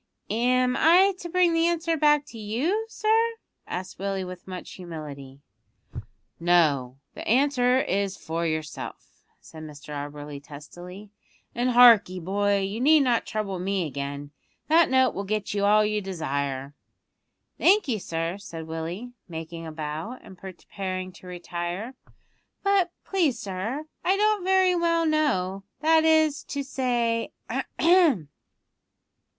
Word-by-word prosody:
"Am 250 +2 +2
I 370 +5 +5
to 345 - -7
bring 355 -1 +3
the 330 0 +3
answer 335 -1 0
back 295 -1 +3
to 230 - -10
you, 295 - -1
sir?" 435 0 +1 0.5
asked 185 +1 -6
Willie 195 -1 -2
with 180 0 -9
much 185 -1 -7
humility. 145 -6 -9 1.0
"No; 150 -7 +2 0.2
the - - -8
answer 255 0 +3
is 195 -3 -1
for 165 +1 -4
yourself," 155 -2 -5 0.2
said 160 - -12
Mr 150 -1 -10
Auberly 145 0 -6
testily; 175 +7 -11 0.4
"and 245 +1 0
hark 240 -5 +7
'ee, 185 0 -6
boy, 200 +3 +1
you 195 +3 -3
need 305 +3 +6
not 245 -3 +1
trouble 205 -4 -3
me 190 -1 -1
again. 140 0 -5 0.4
That 325 +1 +5
note 260 -1 +3
will 200 - -4
get 210 0 -2
you 200 -1 +1
all 210 +1 +5
you 210 0 -1
desire." 140 -7 -3 0.9
"Thank 405 +1 +4
you, 230 -5 0
sir," 165 +2 -3
said 165 -5 -8
Willie, 165 +9 -5 0.2
making 165 0 -7
a - - -6
bow, 155 +10 -5
and 190 - -12
preparing 185 0 -6
to 185 0 -15
retire; 175 +5 -5 0.7
"but 395 -3 +3 0.2
please, 330 -11 +1
sir, 215 +10 -4 0.2
I 380 +2 +2
don't 425 -2 +2
very 375 0 +4
well 335 -1 +2
know, 215 - 0 0.2
that 320 0 +4
is 315 -2 +3
to 285 -1 -4
say 240 -4 -1
ahem!" 325 - +2
200 Hz, 140 wpm, -26 LUFS, -, 1.0 s, hark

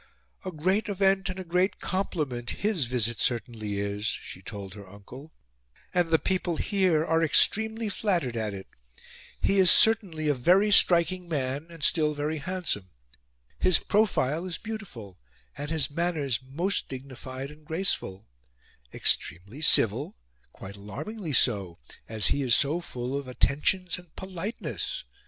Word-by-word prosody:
"A 185 - -4
great 185 +7 0
event 195 -1 +2
and 185 +1 -5
a - - -4
great 180 +3 0
compliment 150 -11 -2
HIS 200 - 0
visit 120 -2 -1
certainly 110 -4 -1
is," 100 0 -3
she 95 - -5
told 100 -2 -8
her 100 -2 -12
uncle, 125 +10 -12 0.6
"and 175 -2 +2
the 160 - +5
people 180 0 -1
HERE 185 -6 +2
are 165 0 +2
extremely 220 +7 +3
flattered 180 - -1
at 110 -2 -2
it. 95 - -8 0.8
He 195 - +3
is 185 -2 +6
certainly 195 -10 +4
a 145 - +4
VERY 185 +11 +3
STRIKING 175 -1 +5
man; 140 0 -2
still 150 -1 +2
very 150 +2 -2
handsome. 165 - -3 0.7
His 185 -3 +4
profile 185 -6 +1
is 175 - -4
BEAUTIFUL 180 - -8 0.4
and 145 +1 -6
his 155 -4 0
manners 150 -7 -1
MOST 165 +10 -2
dignified 130 +1 -7
and 150 +1 -16
graceful; 150 - -2 0.7
extremely 100 - 0
civil 120 - +4 0.3
quite 100 +1 -10
alarmingly 155 - -6
so, 95 -7 +2 0.3
as 110 -3 +1
he 145 - -2
is 125 -4 +3
so 150 +5 +1
full 125 -4 -5
of 140 -1 -4
attentions 175 +8 0
and 175 -3 -19
POLITENESS. 190 - -5
155 Hz, 140 wpm, -27 LUFS, 120-185 Hz, 0.8 s, is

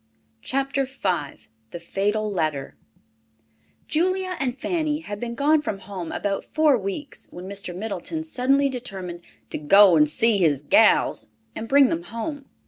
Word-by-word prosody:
CHAPTER 275 - -1
V 185 - -3 0.2
THE 175 - -7
FATAL 205 +5 -1
LETTER 155 -7 -2 1.1
Julia 370 +3 0
and 260 -1 -2
Fanny 310 -3 -1
had 205 -9 -7
been 235 0 -4
gone 295 +4 +3
from 210 - -3
home 190 -4 -7
about 195 -1 -2
four 310 -3 +3
weeks 220 +7 -5
when 180 +1 -9
Mr. 195 -2 -6
Middleton 220 - -4
suddenly 275 -2 +2
determined 190 -9 -6 0.3
"to - - -3
go 190 +5 +6
and 150 -1 +4
see 220 +6 +3
his 150 -6 +2
gals" 110 -5 +3 0.2
and 225 - -5
bring 275 -1 +6
them 165 - -1
home. 270 - -5
215 Hz, 145 wpm, -24 LUFS, 180-275 Hz, 1.1 s, go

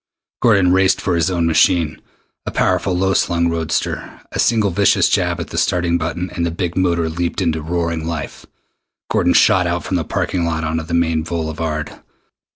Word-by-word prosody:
Gordon 100 -6 +4
raced 95 0 +3
for 90 - -1
his 85 +1 +1
own 85 -2 0
machine, 80 -1 +2 0.5
a - - +1
powerful 90 -2 0
low 95 +1 +1
slung 85 -2 +1
roadster. 80 -1 -3
A - - -5
single 110 -4 +2
vicious 100 +2 +3
jab - - 0
at - - -6
the - - -1
starting 85 -1 +1
button, 85 +2 -3
and 85 - -3
the 85 - 0
big 85 +1 -3
motor 85 -3 +1
leaped 85 +2 -3
into 80 -1 0
roaring 85 0 -2
life. 80 -4 -6 0.6
Gordon - - +2
shot 90 -1 +4
out 85 0 -2
from 95 - -1
the 85 - -1
parking 90 +3 -2
lot 80 -1 -1
onto 80 +1 -2
the 85 +1 -3
main 80 -1 +1
boulevard. 80 -2 -4
85 Hz, 180 wpm, -18 LUFS, 80-90 Hz, 0.6 s, Gordon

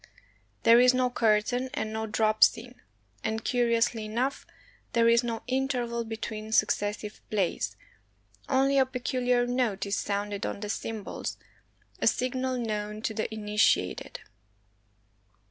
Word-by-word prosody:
There 230 +1 +7
is 250 +1 +6
no 255 -1 +1
curtain 235 +3 +1
and 220 0 -3
no 220 0 -2
drop 215 0 +3
scene. 245 +2 +1 0.4
And, 220 +1 -2
curiously 235 -2 +1
enough, 245 +6 -2 0.5
there 230 -1 +4
is 235 +1 +5
no 230 -1 -3
interval 250 -3 -1
be 225 0 -5
tween 215 -1 -6
successive 210 -1 0
plays, 200 -5 -1 0.7
only 275 +1 +3
a 265 - +5
peculiar 250 -1 0
note 245 -6 0
is 200 0 -1
sounded 205 0 -2
on - - -3
the 210 - -4
cymbals, 220 -1 -4 0.6
a - - +1
signal 255 0 0
known 210 -2 -3
to 220 - -1
the 220 +1 -3
initiated. 210 - 0
230 Hz, 130 wpm, -28 LUFS, 215-250 Hz, 0.7 s, There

